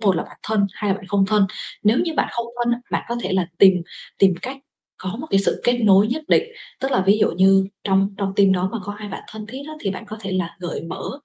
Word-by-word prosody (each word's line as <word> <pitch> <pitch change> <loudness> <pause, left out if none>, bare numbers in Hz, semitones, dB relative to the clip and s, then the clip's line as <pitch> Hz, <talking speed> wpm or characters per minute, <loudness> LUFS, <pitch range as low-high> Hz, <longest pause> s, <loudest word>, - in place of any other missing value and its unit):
một 195 -5 +3
là - - 0
bạn - - -14
thân, 210 -2 +1
hai 210 -2 -2
là - - +3
bạn 195 - -12
không 195 0 +2
thân. 210 -2 +3 0.4
Nếu 215 +4 +4
như 330 -2 -1
bạn - - +1
không 235 -1 -3 0.2
thân 240 - +2
á, 240 - -1
bạn - - 0
có 235 - -2
thể - - -2
là 185 -2 +1
tìm 190 -1 +8 0.5
tìm 190 -2 +5
cách 265 +2 -4 0.5
có 185 +3 -4
một 310 - -6
cái 195 - +4
sự - - +2
kết 245 - +4
nối 200 -2 +5
nhất 280 +8 -2
định, - - +5 0.4
tức 270 +1 -1
là 255 - +3
ví 205 +2 +5
dụ - - +4
như 190 +2 +4 0.2
trong 195 0 +2
trong 195 -1 -1
team 195 -1 +5
đó 185 0 +1
mà 230 - -2
có 205 - -4
ai 210 -1 -7
bạn - - -7
thân 215 -1 -8
thiết 260 +5 -7
á 310 - -7
thì 195 - -1
bạn 210 +4 -6
có 215 +1 -7
thể 195 -2 -4
là 185 -2 -2
gợi 175 -2 -4
mở 165 - -5
200 Hz, 285 wpm, -21 LUFS, 190-220 Hz, 0.5 s, tìm